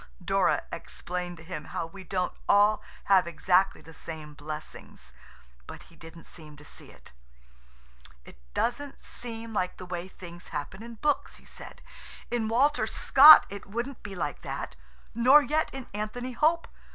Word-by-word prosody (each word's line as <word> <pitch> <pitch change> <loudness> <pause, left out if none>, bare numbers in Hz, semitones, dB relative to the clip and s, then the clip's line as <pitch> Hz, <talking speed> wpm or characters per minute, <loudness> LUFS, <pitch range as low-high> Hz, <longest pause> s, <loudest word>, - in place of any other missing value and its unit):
Dora - - +2
explained 180 0 -5
to 165 - -13
him 165 -3 -7
how - - -4
we 190 +4 -11
don't 185 0 -2 0.2
all 205 +1 +5 0.2
have 190 -3 +4
exactly 180 +3 +2
the 165 - -14
same 160 -2 -8
blessings, 150 - -9 0.5
but - - -10
he 170 - -20
didn't 165 0 -13
seem 150 -3 -12
to 150 - -15
see - - -10
it. - - -17 1.1
"It - - -15 0.2
doesn't 270 +4 -2
seem 230 -1 -8
like 180 -3 -1
the 185 - -8
way 180 0 -5
things 175 -2 -11
happen 185 +8 -6
in 235 0 -9
books," 295 +6 -1
he - - -17
said. - - -11 0.5
"In 235 -2 0
Walter 270 +7 +2
Scott 295 +3 +9
it 200 0 -9
wouldn't 235 +6 -5
be 200 -1 -8
like 155 -5 -4
that, - - -6 0.4
nor 260 +6 +6
yet 310 +2 0
in 265 -2 -7
Anthony 215 +5 -4
Hope. 320 +6 +1
195 Hz, 160 wpm, -28 LUFS, 170-240 Hz, 1.1 s, Scott